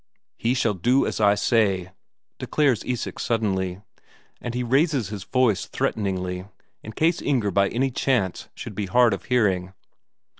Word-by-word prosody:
"He 120 +3 0
shall 115 -4 +1
do 120 +9 +2
as - - -2
I 100 -1 +5
say," 100 -4 +1 0.5
declares 140 -8 +1
Isak 125 -2 -4
suddenly. 95 -5 -1 0.6
And 120 0 -5
he 125 - -1
raises 135 - +1
his 100 -3 -6
voice 125 -6 +1
threateningly, 95 -3 -2 0.4
in 110 - -9
case 165 +7 +1
Inger 120 -8 0
by 100 +1 +3
any 130 +3 0
chance 120 -8 -1
should - - -7
be 105 -2 -3
hard 120 +3 +4
of 100 - -5
hearing. 95 -7 +1
110 Hz, 150 wpm, -24 LUFS, 95-125 Hz, 0.6 s, I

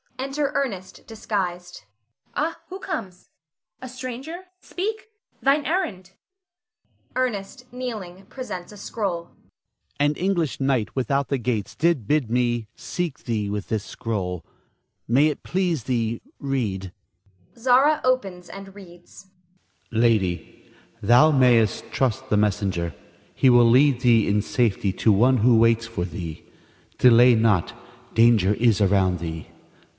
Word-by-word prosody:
[Enter 275 +2 -2
Ernest 195 -9 -4
disguised.] 180 -5 -4 0.5
Ah, 320 +3 -2
who 375 +1 -7
comes? 180 - -6 0.5
A 255 - -7
stranger. 255 +8 -7
Speak! 430 +4 -5 0.3
thine 280 +2 +2
errand! 295 - -2 1.0
Ernest 250 -1 -3
[kneeling, 215 -7 -7
presents 230 -9 -7
a 210 - -12
scroll]. 195 -5 -4 0.7
An 145 +1 +3
English 175 -3 -1
knight 135 -6 0
without 135 +2 0
the 140 - +1
gates 115 -4 -3
did 160 -10 +1
bid 145 -5 +1
me 120 -2 0
seek 170 -5 -5
thee 110 -4 -2
with 105 0 -4
this 110 -2 -1
scroll. 95 -7 -4 0.6
May 135 +6 +4
it 150 - -4
please 175 -7 -1
thee, 115 -2 -1 0.2
read. 105 -10 -3 0.7
Zara 260 +6 +4
[opens 195 -9 -1
and 195 0 -10
reads]. 180 -1 -15 0.6
Lady, 110 -6 0 0.3
Thou 120 +9 +5
mayst 120 -7 +3
trust 130 0 -1
the 105 - +2
messenger. 100 -5 0 0.4
He 130 - +4
will 120 -1 +6
lead 130 +1 +4
thee 115 -3 +4
in 105 +1 +2
safety 105 -4 0
to 110 - +2
one 125 +6 +4
who 120 +1 +4
waits 115 0 +3
for 115 -7 -3
thee. 85 -2 -7 0.5
Delay 120 0 +6
not; 110 -6 +2 0.4
danger 115 -4 +4
is 115 -2 +2
around 95 -2 +2
thee. 80 -1 -6
130 Hz, 125 wpm, -23 LUFS, -, 1.0 s, will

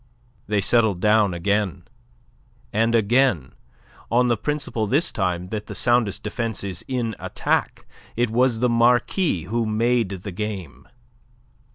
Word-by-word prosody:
They 105 -1 +1
settled 110 -3 +2
down 105 0 +3
again; 100 0 -1 0.9
and 115 +2 +2
again 115 - +2 0.6
on 125 +1 +3
the 120 - +3
principle 135 -3 -2
this 150 - +1
time 90 -2 -2
that 105 0 -5
the - - -7
soundest 120 -4 +1
defence 110 -1 -3
is 95 -4 -5
in 120 -4 -2
attack - - -2 0.3
it 120 -1 0
was 120 -1 +2
the 125 - +4
Marquis 120 - +2
who 115 +5 -1
made 115 0 +1
the 100 0 -6
game. 90 - -6
110 Hz, 135 wpm, -23 LUFS, 100-120 Hz, 0.9 s, the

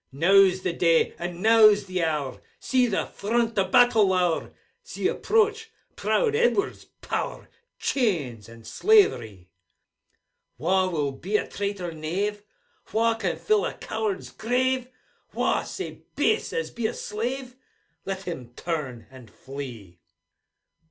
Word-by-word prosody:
Now's 185 +5 +4
the 180 - -1
day, 165 -1 +3
and 175 +1 -5
now's 215 -2 +6
the 185 -2 -2
hour; 150 -5 -2 0.2
See 255 -2 +2
the 200 - -1
front 230 +2 -1
o' 190 - +3
battle 225 0 +5
lower; 180 -3 +1 0.3
See 480 - -3
approach 445 0 +1 0.3
proud 460 -3 +1
Edward's 440 -3 +1
power - - -5 0.3
Chains 145 - -1
and 115 -1 -14
slaverie! 110 - +2 1.1
Wha 185 +3 +2
will 150 -5 -1
be 190 +10 -1
a - - -3
traitor 200 -3 -4
knave? 185 +7 -3 0.5
Wha 230 +1 +2
can 225 - -2
fill 430 -1 +2
a - - -3
coward's 215 -3 -4
grave? 250 +2 0 0.5
Wha - - +1
sae - - -7
base 435 - +1
as 470 0 -3
be 235 -2 -1
a - - -5
slave? 250 +4 -4 0.5
Let 195 0 -4
him 130 -10 -7
turn, 140 -9 -4
and 130 -4 -13
flee 120 -10 -9
195 Hz, 130 wpm, -25 LUFS, 160-235 Hz, 1.1 s, now's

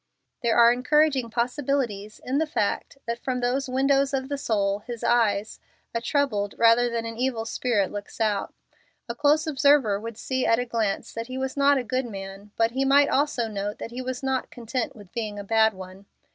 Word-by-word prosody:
There 235 -2 +1
are 235 0 +7
encouraging 270 0 +2
possibilities 240 -4 -2
in 265 +3 0
the 320 - 0
fact 225 0 -2
that 235 0 -3
from 255 -1 -1
those 255 +3 -1
windows 275 +1 +2
of 265 0 -3
the 285 - -2
soul, 200 -6 0
his 235 +1 -8
eyes, 220 -3 +1 0.3
a 230 - -1
troubled 235 -7 0
rather 235 +1 +5
than 230 -1 -3
an 230 0 -6
evil 245 -3 -1
spirit 225 -5 0
looks 205 +2 -8
out. 210 -3 0 0.6
A 235 - -3
close 295 +5 +2
observer 280 -8 +3
would 225 0 -7
see 260 +1 -2
at 230 - +3
a 245 - -1
glance 225 -4 -2
that 230 +1 -5
he 255 0 -6
was 265 0 -3
not 280 0 +4
a 260 - -1
good 255 +2 -2
man, 195 -1 -8
but 225 0 +2
he 265 +3 0
might 280 +1 +5
also 275 -4 +1
note 205 -1 -4
that 230 - -7
he 250 +2 -5
was 255 +1 -5
not 265 -1 -1
content 240 0 -4
with 205 -5 -15
being 215 -3 -4
a 205 - -5
bad 220 0 +3
one. 190 +1 -11
235 Hz, 200 wpm, -25 LUFS, 215-265 Hz, 0.6 s, are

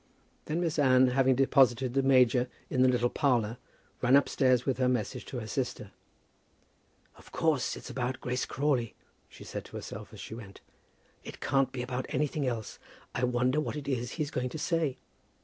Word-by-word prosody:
Then 160 +3 -1
Miss 165 -3 -1
Anne, 130 -2 +5
having 130 0 +3
deposited 130 -2 +3
the 135 - +3
major 125 -2 +4 0.2
in 130 - +2
the 130 - +6
little 120 -1 +2
parlour, 120 -5 +1 0.4
ran 125 +2 +5
upstairs 130 -3 +3
with 130 -2 -1
her 130 -1 +3
message 120 -5 -2
to 130 - -6
her 115 - -4
sister. 110 - -3 1.3
"Of - - -17
course 155 -6 0
it's - - -9
about 125 0 -2
Grace 125 +1 -2
Crawley," 135 -5 0 0.3
she - - -13
said - - -6
to - - -12
herself - - -7
as - - -12
she - - -8
went. 105 -4 -10 0.6
"It - - -9
can't 135 -1 +1
be 125 -2 -4
about 125 +1 -4
anything 150 -1 -1
else. 115 -3 -4 0.3
I 125 - -2
wonder 125 +4 +1
what 155 - -4
it 145 -2 -6
is 125 -3 -2
he's 150 -3 -3
going 125 0 -2
to 155 - -6
say. 160 -4 0
130 Hz, 185 wpm, -30 LUFS, 125-140 Hz, 1.3 s, the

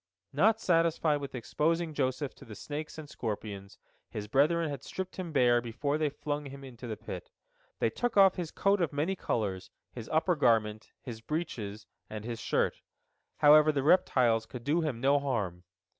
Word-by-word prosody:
Not 215 +10 +4
satisfied 165 -5 +2
with 140 -1 -6
exposing 160 +7 -1
Joseph 135 0 -1
to - - -13
the 110 - -10
snakes 150 +8 -6
and 155 -2 -8
scorpions, 105 -6 -6 0.3
his 105 -1 -6
brethren 155 +8 +3
had 140 -3 -5
stripped 185 +5 -6
him 180 -3 -4
bare 120 -4 +4
before 140 +6 -2
they 155 -1 +1
flung 145 0 -4
him 140 0 -10
into 125 -2 -9
the 110 - -4
pit. - - -8 0.5
They - - +1
took 245 -3 -2
off 195 -2 +7
his 175 -4 -4
coat 195 +2 +1
of 170 - +1
many 155 +7 -1
colors, 100 - -2 0.2
his 115 -3 -8
upper 165 +3 +2
garment, 110 -6 +1
his 115 -4 -7
breeches, 110 -9 -4 0.2
and 110 0 -6
his 115 -1 -4
shirt. - - 0 0.6
However, 150 +1 +7
the 140 -3 -1
reptiles 125 -9 +3
could 125 -2 -8
do 150 +6 +1
him 145 -8 -2
no 140 +2 +4
harm. 100 -11 -3
140 Hz, 175 wpm, -30 LUFS, 115-160 Hz, 0.6 s, off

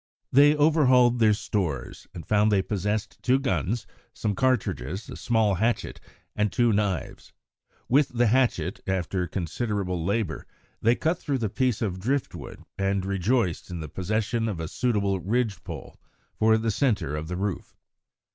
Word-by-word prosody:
They 145 +3 +6
overhauled 130 -6 +4
their 110 -2 +5
stores, 95 - -3
and 85 - -9
found 105 0 +3
they 100 -2 +3
possessed 105 +1 -2
two 130 +1 +3
guns, 105 - -1 0.3
some 105 - -1
cartridges, 100 - -1
a - - -6
small 110 -3 +1
hatchet, 115 +1 -1 0.3
and 105 0 +1
two 120 -3 +2
knives. 100 -4 -2 0.5
With 140 +3 +4
the 120 0 +1
hatchet, 110 -8 +1
after 95 -1 -1
considerable 90 0 -2
labour, 100 +4 -2 0.3
they 115 +2 +4
cut 165 +5 0
through 140 -2 -1
the 110 -4 -1
piece 125 -2 0
of 95 -4 -2
drift 130 +7 -1
wood, - - -9 0.2
and 95 -1 0
rejoiced 100 -1 0
in 90 -1 -5
the 80 -2 -6
possession 110 - -1
of 95 -6 -4
a 80 - -3
suitable 100 -5 0
ridge 110 +1 -1
pole - - -9 0.3
for 110 0 +3
the 110 0 0
centre 100 - 0
of 75 +1 -4
the 90 +1 -4
roof. 100 -1 -4
105 Hz, 155 wpm, -26 LUFS, 95-120 Hz, 0.5 s, They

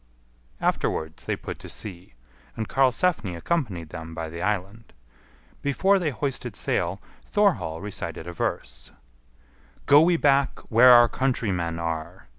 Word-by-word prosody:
Afterwards 80 0 -1
they - - -1
put - - -8
to - - -9
sea, 90 - -7 0.4
and 110 -1 -4
Karlsefni 135 - +1
accompanied 95 - -2
them 80 +1 -8
by 80 0 -4
the 85 +1 -7
island. 105 +3 -3 0.7
Before 190 +8 +2
they 170 -4 0
hoisted 140 +1 -3
sail 90 +3 -1 0.2
Thorhall 190 - +1
recited 100 -5 -5
a 85 - -7
verse: 65 -6 -4 1.0
"Go 145 +1 +7
we 170 +1 +4
back 140 -3 +2
where 120 +3 +7
our 120 -1 +8
countrymen 100 -10 -1
are. 80 -2 -5
105 Hz, 130 wpm, -25 LUFS, 85-140 Hz, 1.0 s, our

